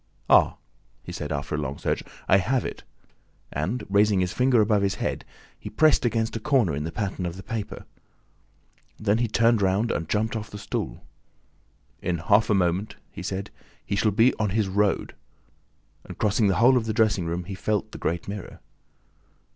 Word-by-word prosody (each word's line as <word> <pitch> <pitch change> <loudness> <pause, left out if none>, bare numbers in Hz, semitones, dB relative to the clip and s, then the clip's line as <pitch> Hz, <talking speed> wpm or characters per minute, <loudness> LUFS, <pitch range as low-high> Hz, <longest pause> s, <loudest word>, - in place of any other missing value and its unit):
"Ah," - - +5 0.5
he - - -8
said, - - -5
after 70 0 -3
a 75 - 0
long 70 -2 -4
search, - - -1 0.3
"I 95 - +6
have 125 +7 0
it!" - - -6 0.7
And, 95 - -2
raising 100 0 +3
his 90 -1 0
finger 125 -1 +3
above 105 -1 +3
his 100 -1 0
head, - - -3 0.4
he - - -7
pressed 155 +2 +3
against 115 -1 0
a - - -2
corner 125 - +2
in 75 +1 -3
the 80 - -4
pattern 100 -2 -3
of 85 -1 -3
the 95 - -9
paper. 110 -3 -5 1.1
Then 110 +1 +1
he 120 - +1
turned 115 0 +3
round 100 +4 +1
and 80 -2 -3
jumped 110 +2 0
off 105 -1 -5
the 105 - -8
stool: - - -5 1.0
"In 90 -1 -1
half 105 +6 +3
a 105 - +4
minute," 95 +2 0 0.2
he - - -8
said, 95 +1 -4 0.3
"he 100 - -2
shall 110 +2 +2
be 115 +5 +4
ON 105 -2 +1
HIS 105 +1 0
ROAD!" 100 +1 0 0.9
and - - -10
crossing 105 0 +2
the 95 - +2
whole 125 +3 +5
of 115 -2 -1
the 110 - 0
dressing 105 -6 +2
room 85 +2 -2
he 95 - -7
felt 105 +1 -2
the - - -9
great 85 0 -2
mirror. 100 0 -7
105 Hz, 190 wpm, -25 LUFS, 95-110 Hz, 1.1 s, I